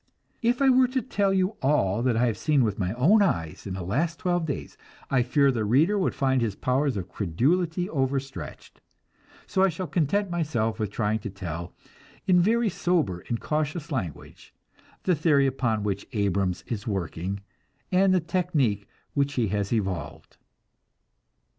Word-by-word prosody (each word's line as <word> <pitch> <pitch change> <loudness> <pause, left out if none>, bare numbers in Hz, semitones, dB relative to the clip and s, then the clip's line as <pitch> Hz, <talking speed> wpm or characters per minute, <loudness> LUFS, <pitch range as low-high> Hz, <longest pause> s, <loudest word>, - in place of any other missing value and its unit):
If 245 +3 +2
I 270 - +6
were 255 0 +5
to 260 +1 -1
tell 200 -5 +1 0.3
all 115 -8 +2
that 120 -2 +1
I 120 - +3
have 115 -3 0
seen 150 -4 +3
with 105 -3 -1
my 90 -2 0
own 165 - +4
eyes 100 - -1
in 95 - -4
the 95 - -5
last 155 - -1
twelve 175 -2 0
days, 140 - -5 0.4
I 130 -2 +4
fear 140 +3 +3
the 115 -4 -1
reader 145 - +3
would 195 -3 0
find 130 -2 +1
his 110 -4 -1
powers 130 +1 0
of 95 -2 -4
credulity 160 - 0
overstretched, 135 - -4 0.6
so 190 - 0
I 195 - +5
shall 180 +2 -4
content 180 +4 0
myself 120 -10 -1
with 105 -2 -1
trying 105 +1 -1
to 105 - -6
tell, 85 -3 -6 0.5
in 180 -2 +5
very 230 +5 +2
sober 170 - 0
and 115 - -1
cautious 155 +1 -2
language, 95 - -6 0.5
the 185 - +3
theory 150 -3 +3
upon 120 -5 0
which 100 -1 -3
Abrams 100 -3 0
is 110 -2 -5
working, 95 -1 -3 0.5
and 190 +1 +4
the 185 - +4
technic 160 - 0 0.3
which 140 0 +1
he 120 -6 0
has 100 0 -1
evolved. 85 -8 -3
130 Hz, 165 wpm, -26 LUFS, -, 0.6 s, I